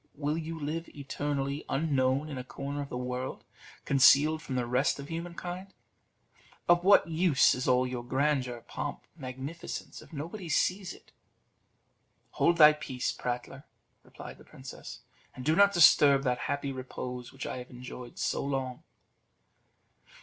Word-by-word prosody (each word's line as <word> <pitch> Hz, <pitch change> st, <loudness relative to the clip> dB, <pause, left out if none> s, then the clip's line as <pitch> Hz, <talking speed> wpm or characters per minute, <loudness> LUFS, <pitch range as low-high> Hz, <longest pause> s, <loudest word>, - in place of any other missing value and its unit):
Will 150 Hz, +1 st, -1 dB
you 165 Hz, 0 st, -5 dB
live 155 Hz, +3 st, -4 dB
eternally 140 Hz, 0 st, -3 dB
unknown 135 Hz, -1 st, +1 dB
in 140 Hz, -4 st, -5 dB
a -, -, -5 dB
corner 140 Hz, +3 st, -5 dB
of 140 Hz, -, -6 dB
the 125 Hz, -, -4 dB
world, 125 Hz, +1 st, -4 dB, 0.4 s
concealed 145 Hz, +3 st, +5 dB
from 135 Hz, -5 st, -5 dB
the 125 Hz, -1 st, 0 dB
rest 125 Hz, +4 st, +1 dB
of 140 Hz, 0 st, -9 dB
human 170 Hz, +1 st, -5 dB
kind? 185 Hz, +3 st, -6 dB, 1.0 s
Of 175 Hz, 0 st, +5 dB
what 200 Hz, -1 st, +6 dB
use 165 Hz, -3 st, +4 dB
is 130 Hz, -, -3 dB
all 125 Hz, 0 st, +4 dB
your 125 Hz, -1 st, -4 dB
grandeur, 130 Hz, -2 st, 0 dB
pomp, -, -, -6 dB
magnificence, 135 Hz, +2 st, -7 dB
if -, -, -16 dB
nobody 165 Hz, +5 st, -6 dB
sees 190 Hz, +3 st, +1 dB
it?" -, -, -15 dB, 1.2 s
"Hold 170 Hz, 0 st, +2 dB
thy 150 Hz, -2 st, +9 dB
peace, 135 Hz, -4 st, -3 dB
prattler," 125 Hz, +3 st, -5 dB, 0.4 s
replied -, -, -11 dB
the -, -, -14 dB
princess, -, -, -10 dB, 0.3 s
"and 125 Hz, -, -8 dB
do 155 Hz, +2 st, +3 dB
not 200 Hz, +2 st, +6 dB
disturb 150 Hz, -5 st, +6 dB
that 125 Hz, -2 st, 0 dB
happy 140 Hz, -1 st, -1 dB
repose 125 Hz, -2 st, -6 dB
which 135 Hz, 0 st, -7 dB
I -, -, -4 dB
have 125 Hz, 0 st, -8 dB
enjoyed 125 Hz, -1 st, -10 dB
so -, -, -1 dB
long." 135 Hz, -2 st, -3 dB
140 Hz, 150 wpm, -30 LUFS, 130-160 Hz, 1.2 s, thy